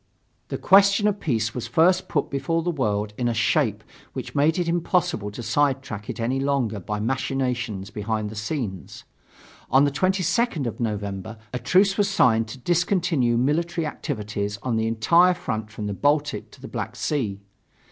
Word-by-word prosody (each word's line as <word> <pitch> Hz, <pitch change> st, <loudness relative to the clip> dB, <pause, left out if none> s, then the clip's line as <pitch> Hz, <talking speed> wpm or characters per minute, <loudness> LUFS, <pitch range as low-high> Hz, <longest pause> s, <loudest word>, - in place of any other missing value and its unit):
The -, -, -4 dB
question 200 Hz, +2 st, +5 dB
of 205 Hz, -1 st, 0 dB
peace 115 Hz, -6 st, -1 dB
was 125 Hz, -, -4 dB
first 180 Hz, +2 st, +3 dB
put 145 Hz, -, -1 dB
before 150 Hz, +4 st, -1 dB
the 175 Hz, -, 0 dB
world 105 Hz, -8 st, -1 dB
in 120 Hz, -, +1 dB
a 120 Hz, -, 0 dB
shape 110 Hz, 0 st, +1 dB, 0.3 s
which -, -, -6 dB
made 150 Hz, +4 st, +3 dB
it 175 Hz, -2 st, 0 dB
impossible 170 Hz, -, 0 dB
to 105 Hz, +4 st, -8 dB
side 140 Hz, +1 st, +1 dB
track 105 Hz, -2 st, -7 dB
it 120 Hz, -1 st, -5 dB
any 125 Hz, +4 st, 0 dB
longer 135 Hz, -6 st, 0 dB
by 105 Hz, +3 st, -4 dB
machinations 120 Hz, -4 st, -2 dB
behind 105 Hz, 0 st, -3 dB
the -, -, -8 dB
scenes. 110 Hz, -, -4 dB, 0.7 s
On 135 Hz, +3 st, +5 dB
the 145 Hz, -, +2 dB
22nd 185 Hz, -, +1 dB
of 115 Hz, -, -4 dB
November 105 Hz, -1 st, -3 dB, 0.2 s
a 125 Hz, -, -2 dB
truce 195 Hz, -, +3 dB
was 205 Hz, -1 st, +3 dB
signed 115 Hz, -, +3 dB
to 110 Hz, -, -8 dB
discontinue 165 Hz, -4 st, +1 dB
military 160 Hz, +6 st, 0 dB
activities 105 Hz, -7 st, -4 dB
on 125 Hz, -3 st, 0 dB
the 110 Hz, 0 st, +1 dB
entire 170 Hz, +12 st, +4 dB
front 110 Hz, -11 st, -4 dB
from 110 Hz, 0 st, -6 dB
the 105 Hz, -, -2 dB
Baltic 145 Hz, +6 st, 0 dB
to -, -, -17 dB
the -, -, -8 dB
Black -, -, -5 dB
Sea. 110 Hz, -10 st, -2 dB
130 Hz, 175 wpm, -24 LUFS, 110-165 Hz, 0.7 s, question